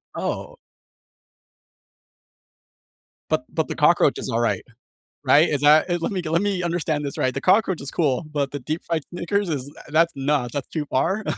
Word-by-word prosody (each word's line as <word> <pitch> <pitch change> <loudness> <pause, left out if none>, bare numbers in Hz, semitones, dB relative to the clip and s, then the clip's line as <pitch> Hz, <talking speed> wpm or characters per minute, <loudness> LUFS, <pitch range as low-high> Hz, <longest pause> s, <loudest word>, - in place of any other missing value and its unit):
Oh. - - -4 2.7
But - - +1
but - - 0
the - - -4
cockroach - - +4
is - - -5
alright, 115 +1 0 0.6
right? 155 +3 +6
Is 145 -2 -1
that, 155 +4 +5
uh, 175 - +1
let - - -1
me 185 -2 -2
go 160 -2 -5
let 170 +3 +2
me 195 -3 -1
understand 160 -4 -1
this 140 - -5
right, 130 0 0
the 135 - -4
cockroach 190 -3 +3
is 135 - -6
cool, 145 -3 0
but 140 -2 -1
the 145 - -4
deep-fried 160 +2 -3
Snickers 180 +2 -1
is, 140 -2 -3
uh, - - -14
that's 165 +2 +3
nuts, 135 -3 0
that's 140 -2 -3
too 155 -3 -3
far, 190 +11 0
155 Hz, 180 wpm, -23 LUFS, 140-175 Hz, 2.7 s, right